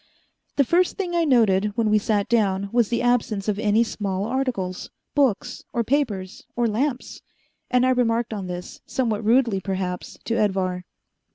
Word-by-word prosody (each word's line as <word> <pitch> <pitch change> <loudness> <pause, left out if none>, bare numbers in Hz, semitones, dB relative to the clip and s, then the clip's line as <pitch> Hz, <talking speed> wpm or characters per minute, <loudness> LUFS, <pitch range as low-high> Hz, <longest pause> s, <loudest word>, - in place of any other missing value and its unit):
The 280 - +4
first 350 +7 +2
thing 365 -3 -2
I 340 -1 +2
noted 210 -6 +3
when 220 -2 +2
we 215 - +5
sat 205 -1 0
down 200 -4 +1
was 235 -3 +2
the 235 0 0
absence 230 -5 +1
of 210 -1 0
any 215 +1 +3
small 200 -3 -3
articles 235 -7 -2 0.2
books 250 -3 0
or 235 - +1
papers 220 -8 -1
or 240 -1 +2
lamps 245 +4 -2 0.5
and 250 0 +3
I 255 - +4
remarked 235 -2 +1
on 195 -3 -4
this, 180 0 -7
somewhat 225 -4 -1
rudely 230 -2 +3
perhaps, 185 -1 -4
to 230 - -1
Edvar. 185 -3 0
220 Hz, 165 wpm, -23 LUFS, 195-245 Hz, 0.5 s, we